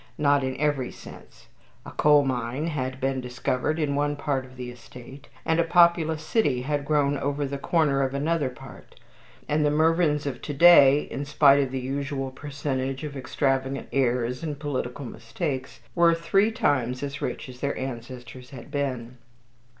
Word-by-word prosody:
Not 145 Hz, -1 st, +3 dB
in 130 Hz, 0 st, -3 dB
every 145 Hz, -3 st, 0 dB
sense. -, -, -14 dB, 0.4 s
A -, -, -8 dB
coal 145 Hz, -1 st, +4 dB
mine 125 Hz, +2 st, -2 dB
had 130 Hz, -5 st, -3 dB
been 135 Hz, 0 st, -1 dB
discovered 125 Hz, +4 st, -2 dB
in 150 Hz, -3 st, 0 dB
one 145 Hz, +1 st, 0 dB
part 145 Hz, -2 st, -2 dB
of 130 Hz, 0 st, -15 dB
the 125 Hz, -1 st, -6 dB
estate, 125 Hz, +3 st, -13 dB, 0.2 s
and 160 Hz, +1 st, +1 dB
a -, -, +5 dB
populous 165 Hz, -2 st, +3 dB
city 145 Hz, -, +1 dB
had 145 Hz, +1 st, -2 dB
grown 145 Hz, -1 st, +1 dB
over 145 Hz, +1 st, -1 dB
the 140 Hz, 0 st, -4 dB
corner 150 Hz, -3 st, +1 dB
of 135 Hz, 0 st, -1 dB
another 150 Hz, 0 st, 0 dB
part; 130 Hz, +1 st, -14 dB, 0.5 s
and 150 Hz, +1 st, +1 dB
the 150 Hz, -, +3 dB
Mervyns 155 Hz, -1 st, +2 dB
of 135 Hz, -3 st, -4 dB
to 145 Hz, -, -5 dB
day, 145 Hz, -3 st, +7 dB
in 140 Hz, -, -5 dB
spite 145 Hz, -1 st, +5 dB
of 135 Hz, -2 st, +1 dB
the 130 Hz, 0 st, -3 dB
usual 135 Hz, +1 st, -3 dB
percentage 135 Hz, -1 st, -4 dB
of 145 Hz, -2 st, -6 dB
extravagant 135 Hz, 0 st, -1 dB
heirs 125 Hz, -2 st, 0 dB
and 155 Hz, -3 st, -4 dB
political 135 Hz, -2 st, -4 dB
mistakes, 130 Hz, +5 st, -5 dB
were 170 Hz, -1 st, +4 dB
three 195 Hz, +6 st, +2 dB
times 140 Hz, -, 0 dB
as 140 Hz, 0 st, -5 dB
rich -, -, -4 dB
as 125 Hz, -1 st, -11 dB
their 140 Hz, +1 st, -2 dB
ancestors 125 Hz, -1 st, -7 dB
had 130 Hz, +1 st, -11 dB
been. 130 Hz, -4 st, -3 dB
140 Hz, 170 wpm, -25 LUFS, 130-150 Hz, 0.5 s, day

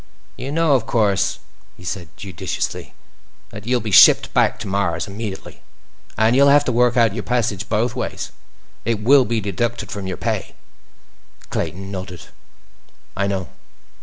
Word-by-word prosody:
"You 130 Hz, +3 st, -6 dB
know, 160 Hz, -1 st, +2 dB
of 120 Hz, -4 st, +1 dB
course," 100 Hz, -4 st, +1 dB, 0.4 s
he 90 Hz, -, -14 dB
said 90 Hz, -1 st, -5 dB
judiciously, 95 Hz, -6 st, -5 dB, 0.6 s
"that 105 Hz, 0 st, -10 dB
you'll 125 Hz, -1 st, +1 dB
be 110 Hz, 0 st, -4 dB
shipped -, -, +7 dB
back -, -, +2 dB
to -, -, -5 dB
Mars 95 Hz, -2 st, -1 dB
immediately. 100 Hz, 0 st, -7 dB, 0.6 s
And 110 Hz, +2 st, +3 dB
you'll 140 Hz, +1 st, +6 dB
have 145 Hz, +1 st, +5 dB
to -, -, 0 dB
work 125 Hz, +1 st, +2 dB
out 115 Hz, -4 st, +4 dB
your 115 Hz, -, -3 dB
passage 115 Hz, -4 st, -1 dB
both 120 Hz, +3 st, 0 dB
ways—it 115 Hz, -2 st, -6 dB
will 135 Hz, +2 st, +6 dB
be 115 Hz, 0 st, -1 dB
deducted 115 Hz, +4 st, -3 dB
from 100 Hz, -2 st, -5 dB
your 95 Hz, -, -4 dB
pay." -, -, -3 dB, 1.0 s
Clayton 95 Hz, +2 st, -4 dB
nodded. 90 Hz, -2 st, -7 dB, 0.9 s
"I 100 Hz, 0 st, 0 dB
know." 95 Hz, -2 st, -3 dB
110 Hz, 150 wpm, -20 LUFS, 95-120 Hz, 1.0 s, shipped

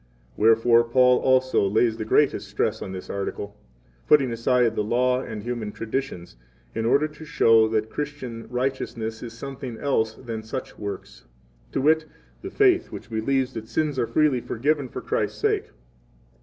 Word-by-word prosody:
Wherefore 115 Hz, +2 st, +5 dB
Paul 125 Hz, +1 st, +4 dB
also 130 Hz, 0 st, +3 dB
lays 110 Hz, +4 st, +3 dB
5 -, -, -11 dB
the 110 Hz, -, -3 dB
greatest 140 Hz, +5 st, +2 dB
stress -, -, -1 dB
on -, -, -5 dB
this 95 Hz, -1 st, -7 dB
article, 100 Hz, +1 st, -5 dB, 0.5 s
putting 140 Hz, -5 st, +5 dB
aside 115 Hz, 0 st, +2 dB
the 105 Hz, -, 0 dB
Law 125 Hz, +3 st, +1 dB
and 110 Hz, -5 st, -7 dB
human 120 Hz, -3 st, -4 dB
traditions, 110 Hz, -, -5 dB, 0.4 s
in 115 Hz, 0 st, -1 dB
order 140 Hz, +5 st, +3 dB
to 150 Hz, +1 st, -13 dB
show 115 Hz, -8 st, +4 dB
that 110 Hz, 0 st, -1 dB
Christian 130 Hz, -6 st, -5 dB
righteousness 125 Hz, -3 st, -3 dB
is 115 Hz, -2 st, -7 dB
something 130 Hz, -1 st, -7 dB
else 110 Hz, -6 st, 0 dB
than 115 Hz, -3 st, -6 dB
such 110 Hz, +4 st, -7 dB
works, 80 Hz, -, -7 dB, 0.5 s
to -, -, -1 dB
wit, 155 Hz, +2 st, +3 dB, 0.4 s
the -, -, -6 dB
faith 375 Hz, -4 st, +3 dB
which -, -, -9 dB
believes 130 Hz, +4 st, 0 dB
that 110 Hz, -1 st, -7 dB
sins 150 Hz, -1 st, -1 dB
6 -, -, 0 dB
are 115 Hz, -, -1 dB
freely 150 Hz, -5 st, +3 dB
forgiven 140 Hz, +4 st, -1 dB
for -, -, -6 dB
Christ's -, -, -2 dB
sake. -, -, +1 dB
120 Hz, 170 wpm, -24 LUFS, 110-135 Hz, 0.5 s, Wherefore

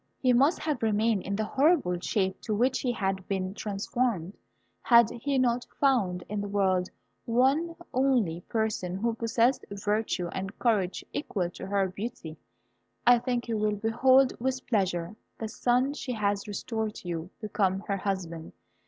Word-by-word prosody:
He 255 Hz, -2 st, +3 dB
must 275 Hz, +7 st, +4 dB
have 300 Hz, -6 st, -2 dB
remained 220 Hz, -1 st, +2 dB
in 200 Hz, +2 st, -3 dB
the 215 Hz, +1 st, -1 dB
horrible 275 Hz, -, +2 dB
shape 190 Hz, +1 st, -1 dB
to 215 Hz, -, -2 dB
which 250 Hz, +4 st, +2 dB
he 250 Hz, -, 0 dB
had 195 Hz, -4 st, -2 dB
been 190 Hz, -1 st, -2 dB
transformed, 205 Hz, -2 st, -2 dB, 0.5 s
had 235 Hz, -2 st, +6 dB
he 275 Hz, +4 st, -2 dB
not 245 Hz, -1 st, +1 dB
found 205 Hz, -11 st, +2 dB
in 210 Hz, 0 st, -3 dB
the 205 Hz, -, -4 dB
world 190 Hz, -2 st, +1 dB, 0.4 s
one 270 Hz, +8 st, +2 dB, 0.2 s
only 245 Hz, -11 st, +2 dB
person 215 Hz, -5 st, -1 dB
who 230 Hz, +4 st, 0 dB
possessed 230 Hz, +3 st, +1 dB
virtue 205 Hz, -2 st, -1 dB
and 195 Hz, +3 st, -5 dB
courage 205 Hz, -6 st, 0 dB
equal 185 Hz, -, -2 dB
to 190 Hz, -, -8 dB
her 195 Hz, -1 st, +1 dB
beauty. 185 Hz, -4 st, -6 dB, 0.7 s
I 245 Hz, 0 st, +7 dB
think 245 Hz, 0 st, -2 dB
you 225 Hz, -2 st, -1 dB
will 210 Hz, 0 st, +1 dB
behold 250 Hz, +5 st, +4 dB
with 260 Hz, +1 st, -2 dB
pleasure 190 Hz, -5 st, 0 dB, 0.2 s
the 220 Hz, -, -4 dB
son 250 Hz, +5 st, +1 dB
she 265 Hz, -3 st, -4 dB
has 205 Hz, -2 st, -1 dB
restored 215 Hz, +1 st, -3 dB
to -, -, -10 dB
you 170 Hz, 0 st, -4 dB
become 195 Hz, -3 st, 0 dB
her 200 Hz, -1 st, -2 dB
husband. 180 Hz, -5 st, -4 dB
215 Hz, 160 wpm, -28 LUFS, 190-245 Hz, 0.7 s, I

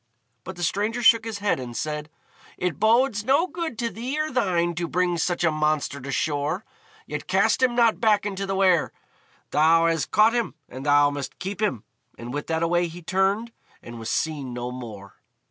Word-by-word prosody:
But 190 Hz, -, -7 dB
the 175 Hz, -, -5 dB
stranger 215 Hz, +7 st, -1 dB
shook 230 Hz, -1 st, +6 dB
his 225 Hz, -2 st, -4 dB
head, 205 Hz, -7 st, 0 dB
and 120 Hz, -2 st, -6 dB
said, 150 Hz, +1 st, -3 dB, 0.5 s
"It 180 Hz, -2 st, -2 dB
bodes 225 Hz, 0 st, +3 dB
no 275 Hz, +8 st, +3 dB
good 325 Hz, -6 st, -5 dB
to 235 Hz, 0 st, -2 dB
thee 255 Hz, +7 st, -4 dB
or 310 Hz, 0 st, -1 dB
thine 175 Hz, -8 st, +1 dB
to 170 Hz, 0 st, -3 dB
bring 175 Hz, 0 st, 0 dB
such 175 Hz, +1 st, 0 dB
a 160 Hz, -, +3 dB
monster 150 Hz, -2 st, -1 dB
to 140 Hz, +2 st, -6 dB
shore. 150 Hz, +6 st, -1 dB, 0.4 s
Yet -, -, -6 dB
cast -, -, +2 dB
him 250 Hz, -2 st, +3 dB
not 235 Hz, -2 st, +3 dB
back 215 Hz, -3 st, +3 dB
into 195 Hz, -1 st, -3 dB
the 195 Hz, -, -1 dB
Wear; 185 Hz, -4 st, +3 dB, 0.6 s
thou 165 Hz, +2 st, +4 dB
has 165 Hz, -2 st, +1 dB
caught 215 Hz, +3 st, +4 dB
him, 235 Hz, -10 st, -1 dB
and 130 Hz, +3 st, -8 dB
thou 145 Hz, 0 st, +5 dB
must 140 Hz, -2 st, -6 dB
keep 200 Hz, +2 st, -5 dB
him," 130 Hz, -, 0 dB, 0.3 s
and 120 Hz, +1 st, -7 dB
with 145 Hz, +1 st, -4 dB
that 160 Hz, 0 st, 0 dB
away 175 Hz, +1 st, +2 dB
he 170 Hz, +1 st, -10 dB
turned, 195 Hz, +6 st, 0 dB, 0.3 s
and 120 Hz, -1 st, -9 dB
was 115 Hz, -, -5 dB
seen 145 Hz, -6 st, -2 dB
no 125 Hz, 0 st, -4 dB
more. 110 Hz, -6 st, -9 dB
175 Hz, 195 wpm, -24 LUFS, 145-215 Hz, 0.6 s, shook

